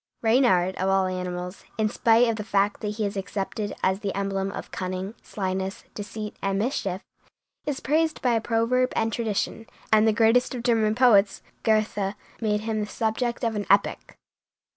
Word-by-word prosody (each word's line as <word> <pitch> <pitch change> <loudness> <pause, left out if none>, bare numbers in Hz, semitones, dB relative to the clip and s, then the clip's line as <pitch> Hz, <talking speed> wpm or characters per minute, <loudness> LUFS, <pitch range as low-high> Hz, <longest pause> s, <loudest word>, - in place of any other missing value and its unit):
Reynard, 220 -6 +3
of 190 +1 0
all 195 0 +3
animals, 180 0 -4
in 220 -1 +2
spite 230 +2 +4
of 225 -1 0
the 210 - -4
fact 200 -1 +1
that 210 -1 -3
he 215 - 0
is 200 - -3
accepted 200 +1 -3
as 190 +1 +2
the 200 -2 -3
emblem 195 0 -1
of - - -7
cunning, 185 +2 -4
slyness, 190 -1 -3
deceit, 210 0 -6
and 195 0 0
mischief, 200 -4 -2 0.6
is 290 -3 -1
praised 315 +2 +1
by 240 -3 +2
proverb 235 +3 +1
and 225 0 0
tradition, 225 0 -2 0.3
and 215 0 +6
the - - +5
greatest 230 +4 +3
of 240 - -5
German 220 -3 +2
poets, 215 -5 +4 0.2
Goethe, 215 -2 +1 0.3
made 210 -2 +1
him 220 0 -2
the 210 - -2
subject 235 +3 -2
of 225 -2 0
an 205 -1 -3
epic. 200 +1 +1
210 Hz, 170 wpm, -25 LUFS, 195-230 Hz, 0.6 s, and